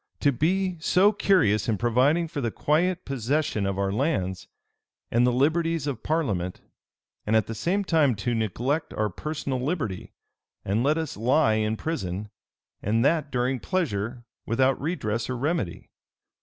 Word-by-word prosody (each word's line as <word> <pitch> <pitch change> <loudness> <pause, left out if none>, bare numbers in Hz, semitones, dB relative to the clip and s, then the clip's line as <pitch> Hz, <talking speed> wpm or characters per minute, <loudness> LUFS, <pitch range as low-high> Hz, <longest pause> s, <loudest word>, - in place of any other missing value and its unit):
to 145 - +3
be 180 +6 0
so 185 +5 +4
curious 140 - +2
in 110 - +1
providing 130 - +2
for 155 -3 -4
the 120 - 0
quiet 175 +9 0
possession 135 -4 -1
of 100 -1 -2
our 100 0 0
lands, 100 - -1 0.6
and 120 +2 +4
the - - +3
liberties 160 +4 +1
of 140 -6 -3
parliament; 105 - -1 0.7
and 110 - +2
at 110 -3 +4
the 115 - -5
same 185 - 0
time 155 - +3
to 120 +4 -2
neglect 120 - -1
our 105 -1 0
personal 140 - -3
liberty, 130 - -3 0.5
and 100 +4 +1
let 145 +5 +2
us 160 -3 -3
lie 125 +3 +3
in 110 0 0
prison, 105 - -4 0.5
and 115 +4 +1
that 155 -1 +2
during 125 0 0
pleasure, 120 - -2 0.2
without 130 +4 +2
redress 120 -9 -2
or 125 - -2
remedy! 140 - -2
130 Hz, 155 wpm, -26 LUFS, 110-160 Hz, 0.7 s, so